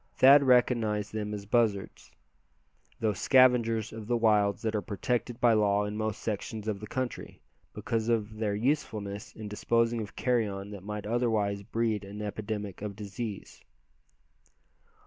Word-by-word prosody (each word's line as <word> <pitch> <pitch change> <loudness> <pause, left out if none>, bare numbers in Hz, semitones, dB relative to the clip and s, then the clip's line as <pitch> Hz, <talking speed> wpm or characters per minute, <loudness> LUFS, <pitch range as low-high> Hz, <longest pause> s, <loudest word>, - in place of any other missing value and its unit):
Thad 140 +2 +8
recognized 120 -5 +2
them 105 -1 -3
as 105 -1 -5
buzzards, 105 -3 0 0.9
those 105 -4 0
scavengers 120 -4 +4
of 110 -1 -8
the 120 0 +1
wilds 105 -3 +2
that 110 -1 0
are 105 - 0
protected 120 +5 -2
by 120 -2 +5
law 105 -1 +2
in 105 0 -4
most 110 0 -3
sections 110 0 -4
of 105 -2 -2
the 105 - -8
country, 130 +2 -4 0.4
because 115 0 -2
of 110 -2 0
their 105 -2 0
usefulness 110 -4 -2
in 110 -1 -7
disposing 115 +2 +1
of 100 -1 -8
carrion 105 -5 -1
that 100 -2 -8
might 105 +1 -6
otherwise 110 -3 0
breed 110 0 -1
an 100 +1 -8
epidemic 105 -2 -5
of 105 -1 -5
disease. 105 0 -7
110 Hz, 145 wpm, -29 LUFS, 105-115 Hz, 0.9 s, Thad